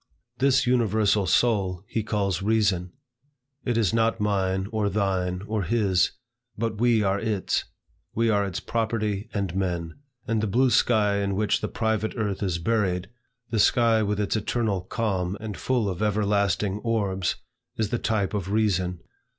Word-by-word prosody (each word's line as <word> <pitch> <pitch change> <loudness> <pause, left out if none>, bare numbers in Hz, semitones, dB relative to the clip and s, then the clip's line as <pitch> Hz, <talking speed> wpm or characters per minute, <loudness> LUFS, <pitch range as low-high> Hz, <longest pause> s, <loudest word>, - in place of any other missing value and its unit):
This 135 0 +3
universal 110 -5 +2
soul, 95 -5 +2
he 110 - -1
calls 100 -4 -1
Reason: 100 -4 +1 0.7
it 120 -2 0
is 110 -3 +2
not 115 0 +2
mine, 95 -2 0
or 110 -2 0
thine, 95 -3 -1
or 110 -1 -1
his, 95 -2 +2 0.4
but 110 -1 -2
we 120 -3 +4
are 100 0 +1
its; 105 -3 -1 0.5
we 115 +1 +2
are 105 -2 +3
its 95 -2 -3
property 110 -3 -2
and 100 -4 -2
men. 85 -4 -2 0.3
And 115 -2 +1
the 110 - 0
blue 125 +5 +3
sky 105 -5 +3
in 100 -1 -1
which 105 +1 +1
the - - -1
private 110 -1 -1
earth 105 -4 -2
is 90 -4 0
buried, 95 -1 0 0.4
the 115 - +1
sky 115 0 +4
with 105 -1 -1
its 105 0 0
eternal 110 -2 -1
calm, 95 -2 -2
and 110 -2 -5
full 125 -5 0
of 90 -1 -3
everlasting 100 -1 +1
orbs, 100 -5 -1 0.4
is 110 -2 0
the 120 - -1
type 110 -3 0
of 100 -3 -2
Reason. 95 -5 0
105 Hz, 160 wpm, -25 LUFS, 95-110 Hz, 0.7 s, we